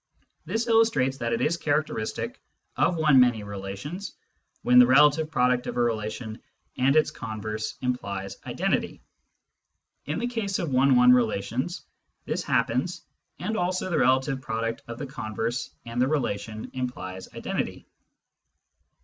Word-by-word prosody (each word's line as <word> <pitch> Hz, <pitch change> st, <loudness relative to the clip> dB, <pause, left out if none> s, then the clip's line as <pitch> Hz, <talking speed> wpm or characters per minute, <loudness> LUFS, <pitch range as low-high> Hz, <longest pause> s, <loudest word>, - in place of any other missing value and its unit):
This 225 Hz, +1 st, -1 dB
illustrates 225 Hz, -, +3 dB
that 115 Hz, -1 st, -2 dB
it 115 Hz, +1 st, 0 dB
is 165 Hz, +6 st, +1 dB
characteristic 150 Hz, -8 st, -2 dB, 0.3 s
of 175 Hz, -, +2 dB
one 155 Hz, -4 st, +5 dB
many 120 Hz, -4 st, +4 dB
relations 100 Hz, -, -6 dB, 0.5 s
when 125 Hz, 0 st, +6 dB
the 125 Hz, -, +8 dB
relative 150 Hz, +4 st, +5 dB
product 125 Hz, -4 st, +2 dB
of -, -, -4 dB
a -, -, +1 dB
relation 110 Hz, -1 st, -2 dB, 0.3 s
and 135 Hz, +3 st, +3 dB
its 155 Hz, -, +4 dB
converse 110 Hz, -1 st, -5 dB
implies 100 Hz, -6 st, -3 dB
identity. -, -, -1 dB, 1.1 s
In 150 Hz, -, -1 dB
the 235 Hz, -, -1 dB
case 225 Hz, -5 st, -2 dB
of 165 Hz, -5 st, -3 dB
one 130 Hz, +1 st, +4 dB
one 125 Hz, 0 st, +7 dB
relations 120 Hz, -, 0 dB, 0.4 s
'this -, -, -2 dB
happens, -, -, 0 dB, 0.3 s
and 220 Hz, -, -3 dB
also 185 Hz, -1 st, -1 dB
the 165 Hz, -, +2 dB
relative 130 Hz, +1 st, +2 dB
product 115 Hz, -1 st, -3 dB
of 115 Hz, 0 st, -6 dB
the 145 Hz, -, -4 dB
converse 120 Hz, -3 st, -3 dB, 0.2 s
and 120 Hz, +1 st, -2 dB
the 130 Hz, -, +4 dB
relation 110 Hz, -7 st, -2 dB
implies 110 Hz, -8 st, -5 dB
identity. -, -, -3 dB
125 Hz, 140 wpm, -26 LUFS, 110-150 Hz, 1.1 s, the